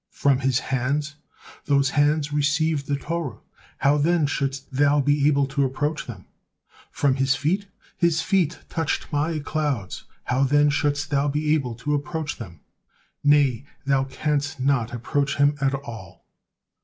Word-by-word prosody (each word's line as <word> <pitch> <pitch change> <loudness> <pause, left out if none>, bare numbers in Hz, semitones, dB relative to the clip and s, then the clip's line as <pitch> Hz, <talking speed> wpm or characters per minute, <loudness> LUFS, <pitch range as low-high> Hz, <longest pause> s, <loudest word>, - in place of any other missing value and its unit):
From 140 -2 +2
his 135 -2 +1
hands? 140 +3 -1 0.5
Those 140 -1 +2
hands 145 0 +2
received 150 0 +1
the 145 - +1
Torah, 150 -3 -4 0.4
how 140 +2 +3
then 165 +1 +3
shouldst 140 -1 -3
thou 145 +2 +3
be 145 +1 +3
able 140 -2 +3
to 140 +1 +1
approach 145 +4 -2
them! 100 -6 -9 0.6
From 140 -2 +1
his 135 +1 +2
feet? 185 +8 -1 0.3
His 170 -2 +2
feet 180 -2 +1
touched 160 -2 -2
My 155 +3 0
clouds, 145 - -3 0.2
how 125 +2 0
then 145 +2 +4
shouldst 145 +1 0
thou 140 0 +2
be 150 +1 +1
able 130 -7 -1
to 150 +6 -2
approach 150 +1 -3
them! 90 -9 -10 0.6
Nay, 140 -3 +3 0.2
thou 135 -1 +2
canst 145 +1 -2
not 130 -3 +1
approach 140 +4 -1
him 145 +1 +4
at 135 0 +2
all." 120 -8 -9
145 Hz, 150 wpm, -24 LUFS, 135-150 Hz, 0.6 s, then